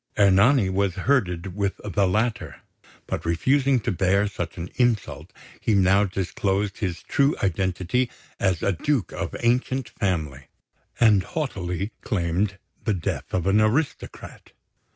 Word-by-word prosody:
Ernani 100 +4 +5
was 95 -1 0
herded 95 -9 0
with 100 -1 -1
the 100 -1 +1
latter; 110 +5 -1 0.4
but - - -4
refusing 130 - +2
to 120 - -1
bear 95 +2 +2
such 90 -4 -5
an 85 0 -5
insult, 120 -4 0 0.3
he 110 - +1
now 100 +1 +4
disclosed 95 +1 -2
his 90 -6 -3
true 140 +2 +2
identity 95 +6 0 0.3
as 95 -4 0
a 100 - +2
Duke 125 - -1
of - - -4
ancient 125 +1 +1
family, 75 -11 -3 0.5
and 110 -5 +5
haughtily 100 - -3
claimed 95 0 -1 0.3
the 110 - +1
death 80 -5 -4
of 90 -2 -1
an 100 +2 +4
aristocrat. 130 +8 -2
100 Hz, 130 wpm, -24 LUFS, 90-115 Hz, 0.5 s, Ernani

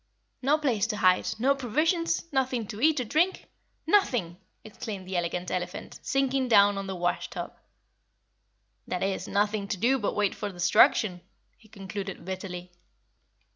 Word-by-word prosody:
"No 280 +4 +3
place 255 -9 0
to 210 - -3
hide, 185 -2 +3
no 260 +5 +3
provisions, 310 - 0
nothing 255 -4 0
to 210 - -6
eat 310 0 +4
or - - 0
drink. 325 - +1 0.4
NOTHING!" 245 - +2 0.3
exclaimed 205 -3 -7
the 190 - -4
Elegant 175 +1 -2
Elephant, 180 -1 -5
sinking 270 -1 0
down 205 -3 +5
on 195 - -5
the 190 - -4
wash 175 0 -1
tub. - - -6 1.3
"That 180 - -2
is, 195 0 -2
nothing 205 0 0
to 200 - -2
do 250 +7 +2
but 210 - -2
wait 205 -2 +1
for 205 - -4
destruction," 180 +1 +3 0.3
he 220 - -22
concluded 195 -2 -7
bitterly. 180 -1 -6
210 Hz, 150 wpm, -27 LUFS, 185-265 Hz, 1.3 s, down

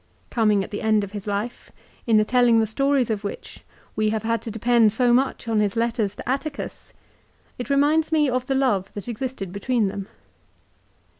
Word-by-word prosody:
Coming 210 -4 +2
at - - -9
the 205 - -4
end 215 -1 +2
of 200 - -6
his 205 -1 -7
life, 205 +4 -4 0.4
in 225 -2 +5
the 215 - +4
telling 245 -1 +4
the 220 - +3
stories 270 +2 +1
of 210 -1 -2
which 200 - -7 0.3
we 215 0 +1
have 220 0 -2
had 230 0 0
to - - -6
depend 225 0 +3
so 240 +2 +2
much 260 -1 0
on 225 -2 +1
his 210 0 0
letters 230 -3 0
to - - -9
Atticus, 280 +3 -4 0.7
it 245 - -5
reminds 295 +3 +2
me 305 -2 +3
of 255 -1 -1
the 270 - 0
love 210 -8 +1
that 205 - -7
existed 240 -5 -4
between 210 +2 0
them. 195 0 -6
230 Hz, 195 wpm, -23 LUFS, 210-255 Hz, 0.7 s, in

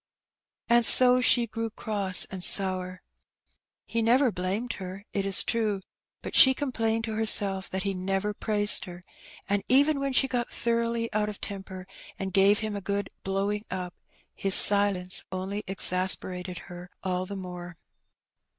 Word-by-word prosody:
And 235 0 +3
so 250 +2 +6
she 245 -1 +3
grew 225 0 -5
cross 205 -4 0
and 190 -2 -5
sour. 185 -2 0 0.8
He 230 - -3
never 245 +3 +2
blamed 200 +6 -3
her, 190 +2 -8
it 195 -1 -2
is 195 - +4
true, 215 -4 -1 0.4
but - - -7
she 265 0 +8
complained 225 -5 -2
to 225 -1 -4
herself 200 -3 +4
that 190 0 -3
he 200 -1 -2
never 195 +2 -3
praised 205 0 0
her, 175 -1 -11 0.4
and 200 0 0
even 280 +3 +3
when 275 0 -2
she 270 - +3
got 245 -2 -3
thoroughly 230 0 -2
out 210 0 -1
of 210 - -9
temper, 190 -2 -7 0.3
and 190 -1 -6
gave 200 +2 +3
him 215 -1 -4
a 200 - -5
good 200 +1 -3
"blowing 200 +2 -2
up," 180 -1 -5 0.4
his 195 -1 +2
silence 200 -3 +3
only 190 +3 -5
exasperated 185 -1 -1
her 180 0 -11
all 185 -1 -3
the 200 - -7
more. 180 -2 -9
200 Hz, 155 wpm, -26 LUFS, 185-225 Hz, 0.8 s, she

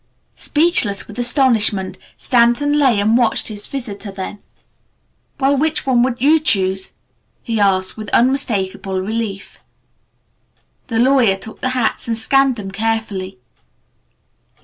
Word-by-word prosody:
Speechless 295 - +1
with 210 +2 -9
astonishment, 235 -7 +2 0.2
Stanton 245 +4 +2
lay 255 -7 +3
and 215 +3 +2
watched 235 -2 +1
his 205 -1 -4
visitor, 220 -6 -6
then 195 +1 -7 1.0
"Well, 275 +1 +2
which 310 +3 0
one 255 -3 +2
would 250 -1 0
you 300 +5 +4
choose?" 190 -9 0 0.5
he 225 -2 -2
asked 190 -1 +1
with 215 -2 -6
unmistakable 210 -7 0
relief. 210 0 -5 1.3
The 230 - -2
lawyer 245 -4 +4
took 205 +3 -10
the 255 - +1
hats 235 - -1
and 230 -1 -1
scanned 270 +3 +2
them 200 -4 -7
carefully. 215 - -3
225 Hz, 125 wpm, -18 LUFS, 200-260 Hz, 1.3 s, you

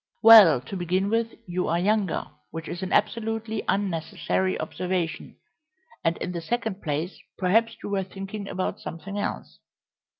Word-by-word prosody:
"Well, 210 - +9
to 130 +10 -8
begin 185 +3 0
with, 230 0 0
you 180 0 -2
are 170 - +1
younger, 200 +1 +1 0.2
which 165 0 -7
is 175 - -5
an 190 - -4
absolutely 225 -1 0
unnecessary 190 0 -1
observation; 180 -2 -3 0.7
and 165 0 +1
in - - -4
the 170 -1 -4
second 220 +1 -2
place, 155 +4 -3 0.2
perhaps 225 +5 +2
you - - -4
were 195 -1 0
thinking 195 +2 -7
about 185 0 -2
something 195 +5 -6
else." - - -4
190 Hz, 145 wpm, -26 LUFS, 175-215 Hz, 0.7 s, Well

